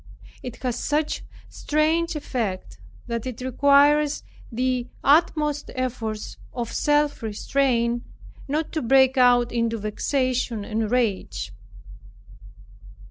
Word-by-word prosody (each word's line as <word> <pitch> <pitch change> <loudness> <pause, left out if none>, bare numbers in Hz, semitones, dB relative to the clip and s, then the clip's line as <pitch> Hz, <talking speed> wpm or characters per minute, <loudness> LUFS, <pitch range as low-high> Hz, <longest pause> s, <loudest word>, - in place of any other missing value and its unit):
It 250 0 -8
has 250 -2 -2
such 300 +1 -1 0.2
strange 320 +3 0
effect, 195 - -4 0.3
that 235 +1 -3
it 250 -3 -6
requires 285 +3 +3 0.3
the 250 +1 -1 0.2
utmost 300 0 +2
efforts 230 -4 -4 0.2
of 235 -2 -4
self 295 -1 +1
restraint, 235 +1 0 0.5
not 300 +3 -1
to 315 - -2
break 265 +2 +4
out 245 -2 +4
into 230 -1 0
vexation 240 +1 -1
and 220 0 -2
rage. 190 - -1
255 Hz, 100 wpm, -24 LUFS, 230-290 Hz, 0.5 s, break